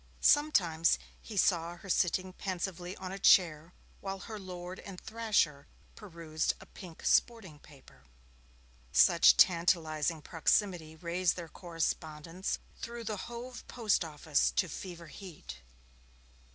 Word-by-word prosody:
Sometimes 180 - +4 0.2
he 215 - -8
saw 170 -2 +2
her 195 - -13
sitting 185 0 +1
pensively 180 -1 -4
on 185 -1 -6
a 195 - -6
chair 170 -4 +4 0.3
while 195 0 -4
her 220 -2 -7
lord 180 -1 -7
and 190 -2 -9
thrasher 215 -11 0 0.3
perused 165 -6 -3
a - - -13
pink 175 -4 -12
sporting 205 -11 +1
paper. 140 -3 -18 0.9
Such - - +6
tantalizing 165 -3 +3
proximity 165 -1 0
raised 170 +2 0
their 170 -2 -7
correspondence 165 0 -3 0.2
through 235 0 -6
the 215 -2 -3
Hove 240 +1 -8
Post 220 -6 +1
Office 155 -1 0
to 185 - +2
fever 175 +1 -8
heat. 155 - -10
175 Hz, 120 wpm, -32 LUFS, 160-195 Hz, 0.9 s, Such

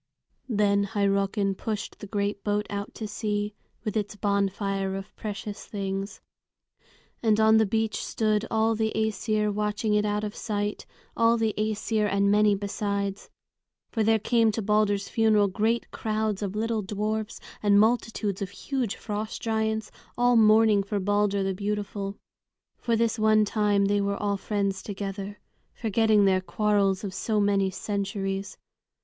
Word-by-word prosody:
Then 200 -2 +2
Hyrrockin 200 -1 +1
pushed 210 +1 -5
the 205 - -8
great 200 0 -2
boat 210 0 0
out 200 0 -5
to 220 - -5
sea, 210 0 -2 0.3
with 215 -2 -3
its 210 -1 -2
bonfire 195 -1 -1
of 195 0 -8
precious 210 -1 -6
things. 195 -1 -4 1.0
And 220 -2 +3
on 220 0 +6
the 220 -1 +3
beach 220 0 -1
stood 215 -1 0
all 225 0 +2
the 220 0 0
Æsir 215 -1 0
watching 210 +1 -1
it 210 0 +3
out 210 0 -1
of 210 -1 -4
sight, 205 -1 -3 0.3
all 230 0 +4
the 220 -2 +1
Æsir 215 0 0
and 200 0 +3
many 210 0 +4
besides. 200 0 -3 0.6
For 225 - -1
there 225 +1 +4
came 225 +1 +2
to 225 - -2
Balder's 205 -1 +2
funeral 215 -2 +3
great 220 +4 0
crowds 215 -2 -2
of 200 -1 -3
little 225 0 0
dwarfs 210 +2 -3 0.2
and 205 -1 +5
multitudes 220 -3 +1
of 195 - -2
huge 250 +1 -3
frost 215 +1 -4
giants, 220 -1 -1 0.3
all 245 0 +4
mourning 215 -1 +5
for 200 +1 -2
Balder 205 0 +1
the 195 0 0
beautiful. 200 0 -3 0.6
For 235 - 0
this 225 0 +1
one 215 0 +4
time 205 -1 +2
they 205 0 +2
were 200 0 -1
all 200 -1 -1
friends 200 -1 -1
together, 200 0 -5 0.4
forgetting 220 -2 +3
their 190 -1 +3
quarrels 195 +1 +1
of 195 -2 -4
so 215 +3 0
many 200 -1 +2
centuries. 195 0 -3
210 Hz, 150 wpm, -27 LUFS, 200-220 Hz, 1.0 s, on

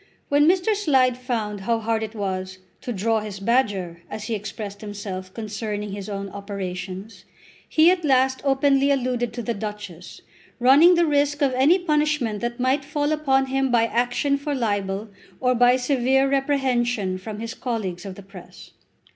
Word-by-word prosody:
When 290 +1 +4
Mr. 370 +4 +3
Slide 265 -10 +3
found 230 -5 -3
how 230 +4 +1
hard 225 0 -1
it 220 0 -5
was 190 -2 -3 0.2
"to 245 - -5
draw 225 +1 +1
his 210 -2 -7
badger," 195 -7 0
as 210 0 -6
he 225 +1 -3
expressed 205 -1 -6
himself 200 -3 -6
concerning 210 -1 -4
his 200 +1 -6
own 200 -1 -4
operations, 195 0 -6 0.5
he 325 +2 +5
at 365 -2 -1
last 265 -2 +2
openly 275 0 +3
alluded 250 -3 0
to 240 - -5
the 235 - -1
Duchess, 205 -5 -7 0.4
running 285 +8 +7
the 340 0 +3
risk 290 -1 +1
of 270 -2 +2
any 275 +8 +4
punishment 300 - 0
that 240 +1 -3
might 260 +3 +1
fall 290 +1 -1
upon 270 -3 +2
him 270 0 0
by 235 -2 +3
action 245 +4 0
for 285 0 -2
libel 205 -3 -2 0.3
or 250 -1 +2
by 245 +1 +5
severe 265 +1 +2
reprehension 250 -8 0
from 210 +2 -7
his 225 0 -5
colleagues 200 -8 -4
of 195 -2 -7
the 200 - -11
Press. 180 - -13
240 Hz, 165 wpm, -23 LUFS, 205-270 Hz, 0.5 s, running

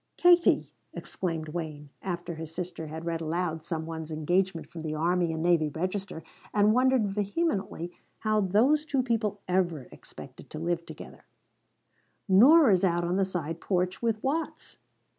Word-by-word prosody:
"Katie," 350 -1 +4 0.2
exclaimed 165 -4 -4
Wayne, 150 -3 -6
after 175 -2 -4
his 160 -1 -7
sister 170 -1 -5
had 160 +2 -7
read 165 -1 -2
aloud 165 0 -2
some 160 -1 -4
one's 160 -1 -6
engagement 175 +3 0
from 165 - -9
the 155 -1 -3
Army 170 +2 +1
and 160 0 -3
Navy 170 -3 +3
Register, 185 +2 -4 0.3
and 210 +1 +4
wondered 255 -2 +3
vehemently 200 - -2 0.3
how 215 -1 +2
those 235 +11 +3
two 275 -4 0
people 220 -4 -1
ever 175 -7 0
expected - - -12
to - - -7
live 170 +1 -2
together, - - -11 1.0
"Nora's 215 - +6
out 175 -2 +2
on 175 +2 0
the 195 - +2
side 165 -3 -4
porch 180 -1 -1
with 225 -2 -1
Watts!" 310 +4 -3
180 Hz, 150 wpm, -28 LUFS, 165-210 Hz, 1.0 s, Nora's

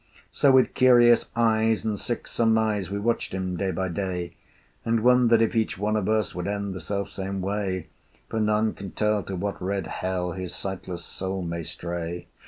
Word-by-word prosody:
So 140 - +4
with 130 -1 +4
curious 120 -2 +5
eyes 110 -1 +2
and 105 -2 -1
sick 120 - -4
surmise 110 -4 +1
We 100 - -2
watched 115 0 -1
him 95 -1 -2
day 95 +2 -1
by 95 +1 -2
day, 90 -1 -3 0.5
And 115 -1 +1
wondered 120 -2 +5
if 115 - 0
each 110 -4 0
one 105 +2 0
of 105 -2 0
us 110 -1 +1
Would 90 0 -4
end 100 -1 -2
the 95 - -6
self 100 +4 -3
same 95 0 -4
way, 95 -2 -2 0.4
For 115 - -2
none 105 0 +2
can 95 -1 -8
tell 105 -1 +1
to 95 +1 -5
what 100 +2 -3
red 95 0 -1
Hell 90 +1 -2
His 90 -1 -5
sightless 90 -3 -5
soul 95 0 -4
may 85 0 -3
stray. 85 +1 -5
100 Hz, 190 wpm, -26 LUFS, 95-110 Hz, 0.5 s, curious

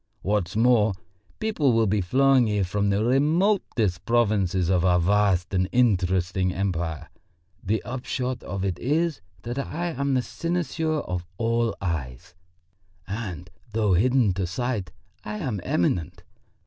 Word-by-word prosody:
What's 100 -3 -1
more, 110 -2 +4 0.4
people 205 - +1
will 115 0 +3
be 105 0 +1
flowing 130 +5 +4
here 105 -2 +1
from 100 +3 0
the 100 +2 +1
remotest 135 - +1
provinces 100 -6 +1
of 90 -1 +2
our 90 -1 +4
vast 95 0 +2
and 90 0 +1
interesting 95 -5 +2
empire. 85 -4 -2 0.6
The 110 +3 -1
upshot 125 0 -3
of 95 +1 -4
it 90 -3 -2
is 155 0 0 0.2
that 120 +3 -4
I 170 +5 -3
am 140 -3 -1
the 125 - +1
cynosure 165 -2 -2
of 90 -1 -3
all 115 -1 0
eyes, 75 -8 -4 0.7
and 95 -4 -5 0.2
though 105 -3 +2
hidden 120 +2 +3
to 95 -1 -2
sight, 105 -1 -3 0.3
I 210 - -5
am 125 - -3
eminent. 85 -2 -1
105 Hz, 135 wpm, -25 LUFS, 90-130 Hz, 0.7 s, more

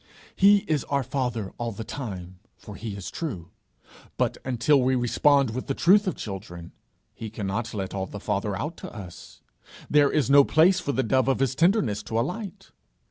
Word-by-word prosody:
He 200 +1 +5
is 150 -4 0
our 140 -1 0
father 125 -6 -3
all 120 -1 -2
the 110 - -6
time, 95 -9 -7 0.2
for - - -11
he 110 -3 -6
is 100 -3 -7
true; 100 - -5 0.7
but - - 0
until 130 +3 +2
we 130 +1 +2
respond 135 +1 +3
with 130 +3 -5
the 135 - -1
truth 200 +4 +4
of 185 - -1
children, 90 -4 -8 0.4
he 110 - -7
cannot 110 +2 -3
let 95 -2 -4
all 95 -1 -3
the 100 - -8
father 100 0 -2
out 150 +9 -4
to - - -8
us; 90 -5 -11 0.5
there 145 -1 +5
is 150 -6 +1
no 140 +1 +7
place 175 +7 +4
for 170 -6 -2
the 130 -1 0
dove 130 +3 +1
of 135 - +2
his 135 -1 0
tenderness 150 - +2
to 110 +2 -2
alight. 195 - -5
125 Hz, 190 wpm, -25 LUFS, 105-145 Hz, 0.7 s, no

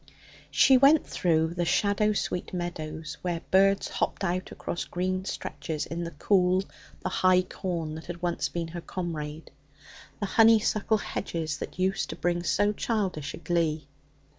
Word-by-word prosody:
She 265 - +6
went 280 +4 +6
through 160 -1 +1
the 175 0 -1
shadow 205 +4 +2
sweet 180 -2 -3
meadows 160 -3 -5
where 175 -2 -2
birds 195 +1 +4
hopped - - -2
out 185 0 -1
across 175 - -4
green 185 +1 -2
stretches 155 -5 -4
in 170 +1 -4
the - - -4
cool, 180 +3 +2 0.4
the - - -2
high 185 0 +4
corn 170 -4 -4
that 160 +1 -8
had 175 -1 -6
once 175 -1 -1
been 170 -1 -3
her 170 +1 -6
comrade, 160 -4 -5 0.7
the 205 - -1
honeysuckle 220 0 +4
hedges 160 -7 -3
that - - -7
used 190 +1 0
to - - -4
bring 175 0 0
so 205 +5 +2
childish 195 - -2
a - - -10
glee. 160 -3 -1
175 Hz, 155 wpm, -28 LUFS, 165-195 Hz, 0.7 s, She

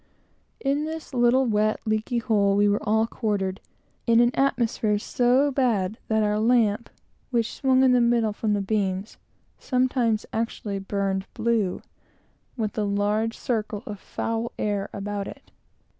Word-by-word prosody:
In 285 +2 0
this 315 -2 -6
little, 245 +1 +4
wet, 215 -1 +1
leaky 215 +2 -1
hole, 205 -4 +2
we 205 +1 +4
were 205 0 +1
all 220 +1 +2
quartered, 205 -4 -2 0.5
in 230 0 +5
an 240 0 +5
atmosphere 230 -5 +1
so 250 +6 +2
bad 225 -7 0
that 220 -1 +2
our 210 0 +1
lamp, 225 -1 +2 0.4
which 235 -3 0
swung 265 -1 +3
in 260 - +5
the 250 -1 +4
middle 235 -2 +2
from 210 0 -1
the 205 - 0
beams, 195 0 -2 0.4
sometimes 250 -4 +1
actually 220 -3 -3
burned 195 -1 -2
blue, 220 -5 0 0.7
with 215 -3 -2
a - - +1
large 205 +3 0
circle 215 -3 -2
of 205 -2 -7
foul 230 +3 -3
air 205 -2 -1
about 200 0 -4
it. - - -11
220 Hz, 145 wpm, -25 LUFS, 205-240 Hz, 0.7 s, in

